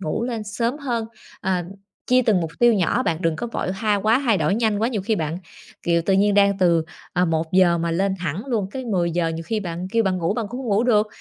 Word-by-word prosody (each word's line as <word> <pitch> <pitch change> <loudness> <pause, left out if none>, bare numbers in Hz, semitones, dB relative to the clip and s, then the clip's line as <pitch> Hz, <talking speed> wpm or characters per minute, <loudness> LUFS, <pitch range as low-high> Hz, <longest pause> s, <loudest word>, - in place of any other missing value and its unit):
ngủ 160 +4 -2
lên 235 -3 -3
sớm 230 +5 -2
hơn, 240 -6 -2 0.4
ờ, 185 -2 0 0.5
chia 255 0 +5
từng 215 -6 +2
mục 165 -2 -3
tiêu 240 0 +5
nhỏ. 205 +5 +1
Bạn 165 - 0
đừng 165 -2 +1
có 240 - -3
vội 230 -5 -3
ha 210 +2 0
quá 215 +4 +2
thay 225 -6 +3
đổi 155 +3 +1
nhanh 220 -2 +1
quá, 225 +2 +1
nhiều 220 -6 -3
khi 220 +3 0
bạn, 160 0 -2 0.4
kiểu, 170 -1 +1
tự 190 +3 +1
nhiên 200 +1 +3
đang 200 -1 +4
từ, 170 -3 +3 0.3
ờ, 180 0 +2
1 160 -1 -1
giờ 180 -2 +4
mà 170 0 -1
lên 190 +3 0
thẳng 175 +2 -3
luôn 225 -7 -1
cái 260 +3 -6
10 180 -7 0
giờ, 170 0 0
nhiều 165 0 -4
khi 220 +4 -1
bạn 175 -1 -5
kêu 230 - +3
bạn 190 -3 0
ngủ 170 +3 0
bạn 230 -2 -2
cũng 245 +4 -6
hông 255 - -5
ngủ 205 +1 +2
được. 215 -3 +3
195 Hz, 260 wpm, -22 LUFS, 170-225 Hz, 0.5 s, chia